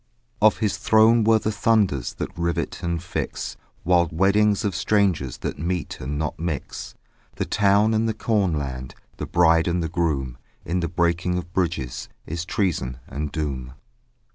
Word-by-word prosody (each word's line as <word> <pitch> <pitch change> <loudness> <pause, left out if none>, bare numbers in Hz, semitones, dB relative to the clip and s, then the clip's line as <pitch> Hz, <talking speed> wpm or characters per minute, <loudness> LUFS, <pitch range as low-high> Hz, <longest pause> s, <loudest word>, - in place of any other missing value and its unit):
Of 110 0 +5
his 105 -3 0
throne 110 +1 +5
were 110 +1 +5
the 110 0 -1
thunders 105 - +1
That - - -5
rivet 85 0 -2
and 85 -2 -2
fix - - -4 0.3
Wild 85 -1 +3
weddings 100 +5 +3
of 100 -4 -1
strangers 95 - +1
That - - -5
meet 85 +1 -3
and 70 +3 -4
not 75 0 -3
mix; 80 -5 -4 0.4
The - - -2
town 105 +2 +3
and 110 +1 +2
the 110 - -2
cornland; 75 - -1 0.2
The - - -4
bride 80 -1 +4
and 85 0 0
the 80 - -2
groom: 70 -8 -1 0.3
In 90 +2 -1
the 85 - -1
breaking 85 +1 +1
of 90 -1 -6
bridges 85 -10 -2 0.2
Is 85 +2 -4
treason 85 - -1
and 75 +1 -4
doom. 65 -5 -3
85 Hz, 160 wpm, -24 LUFS, 75-100 Hz, 0.4 s, Of